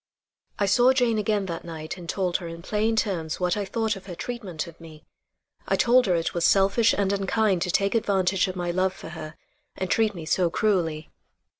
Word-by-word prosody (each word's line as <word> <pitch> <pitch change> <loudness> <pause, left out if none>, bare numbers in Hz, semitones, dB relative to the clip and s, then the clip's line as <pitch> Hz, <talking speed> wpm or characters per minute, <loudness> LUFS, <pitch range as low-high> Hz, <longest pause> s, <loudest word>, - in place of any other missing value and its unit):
I 205 - +1
saw 245 +6 +4
Jane 240 -4 +2
again 210 -1 0
that 170 -3 -5
night 160 -2 -6
and 175 -2 -10
told 185 -3 0
her 175 - -7
in 165 0 -8
plain 215 +3 0
terms 175 -8 -1
what 180 -1 +1
I 205 -1 -2
thought 220 +1 -1
of 195 0 -12
her 180 - -6
treatment 195 -6 -5
of 170 -1 -14
me. 155 -1 -13 0.6
I - - +2
told 245 0 +4
her 180 - +3
it 165 -1 -1
was 170 - -1
selfish 200 +5 +4
and 200 -1 +1
unkind 195 -1 +1
to 180 - -1
take 195 +2 +1
advantage 195 -4 +1
of 185 - -5
my 175 -1 -2
love 185 +1 +1
for - - -10
her 155 0 -8 0.4
and 185 - -4
treat 220 -2 +2
me 165 -2 -7
so 175 +2 +2
cruelly. 165 -6 0
190 Hz, 210 wpm, -25 LUFS, 170-210 Hz, 0.6 s, saw